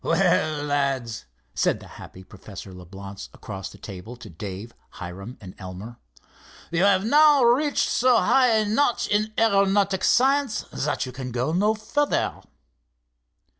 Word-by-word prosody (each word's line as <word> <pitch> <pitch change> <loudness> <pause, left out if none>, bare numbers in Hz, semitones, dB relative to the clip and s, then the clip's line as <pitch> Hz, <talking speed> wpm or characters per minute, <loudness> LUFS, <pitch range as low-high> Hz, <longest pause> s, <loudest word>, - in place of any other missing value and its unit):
"Well, 155 -2 +1
lads," 135 -6 -1 0.3
said - - +1
the - - -13
happy 95 - -11
Professor 95 0 -11
Leblance 95 +2 -10
across 95 -2 -7
the - - -14
table 105 +4 -9
to 120 -5 -12
Dave, 100 +6 -8 0.2
Hiram 95 +7 -8
and 95 -3 -11
Elmer, 95 +5 -9 0.7
"you 170 0 +1
have 195 0 +3
now 295 +2 +5
reached 265 +5 +3
so 250 -1 +3
high 260 +2 +4
a 220 -2 +2
notch 240 +4 +1
in 210 +1 +1
aeronautic 200 -3 +2
science 270 0 +2
that 145 -1 -2
you 130 - -7
can 130 0 -7
go 125 +6 -1
no 210 +5 +2
further." 290 +7 -1
145 Hz, 140 wpm, -24 LUFS, -, 0.7 s, now